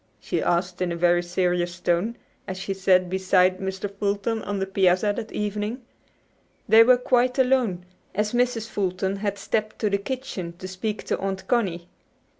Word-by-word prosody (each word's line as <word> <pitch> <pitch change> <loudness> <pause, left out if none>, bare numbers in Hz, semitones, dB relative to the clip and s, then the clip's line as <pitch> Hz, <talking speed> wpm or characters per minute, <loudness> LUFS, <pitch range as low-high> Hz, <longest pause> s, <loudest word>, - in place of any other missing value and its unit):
she - - -2
asked 175 +1 0
in 180 -1 0
a - - -2
very 175 +1 +3
serious 175 0 -1
tone, 175 +6 0 0.3
as 190 - -4
she 195 +1 -3
sat 185 -1 +3
beside 185 0 +2
Mr. 190 +1 -3
Fulton 205 +2 -1
on 205 -1 -3
the 195 - -1
piazza 195 +1 +2
that 220 -2 -6
evening. 210 +3 -3 0.9
They 220 +1 +8
were 250 +2 +6
quite 250 +1 +2
alone, 250 -9 +2 0.3
as 210 +2 0
Mrs. 240 -2 +1
Fulton 190 -1 -2
had 200 0 -2
stepped 215 +2 -2
to 210 -2 0
the 200 - +1
kitchen 200 -7 -5
to 185 - -7
speak 205 +3 -4
to - - -2
Aunt 190 -1 -4
Connie. 185 -8 0
195 Hz, 170 wpm, -24 LUFS, 185-220 Hz, 0.9 s, They